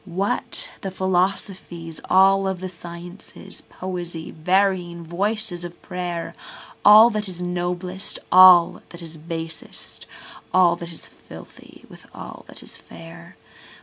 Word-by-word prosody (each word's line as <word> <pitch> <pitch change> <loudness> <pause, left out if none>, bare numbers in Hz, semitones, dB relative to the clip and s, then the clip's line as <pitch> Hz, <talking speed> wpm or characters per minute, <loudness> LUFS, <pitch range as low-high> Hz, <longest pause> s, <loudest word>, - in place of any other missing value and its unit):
What 190 +2 -1
the 195 - -3
philosophies, 185 -3 -2
all 195 +1 +5
the 185 +1 -6
sciences, 175 +1 -10
poesy, 175 -3 -5
varying 180 0 0
voices 185 +1 -2
of 175 0 -9
prayer? 175 -2 -4 0.5
All 215 +3 +9
that 210 -2 -1
is 180 -1 -6
noblest, 180 +1 -3
all 180 -2 +8
that 170 0 -11
is 165 -1 -8
basest, 165 0 -6 0.4
all 180 -2 +5
that 170 0 -7
is 165 - -7
filthy - - -14
with - - -16
all - - -10
that - - -10
is - - -5
fair? 85 0 -13
180 Hz, 120 wpm, -22 LUFS, 170-190 Hz, 0.5 s, All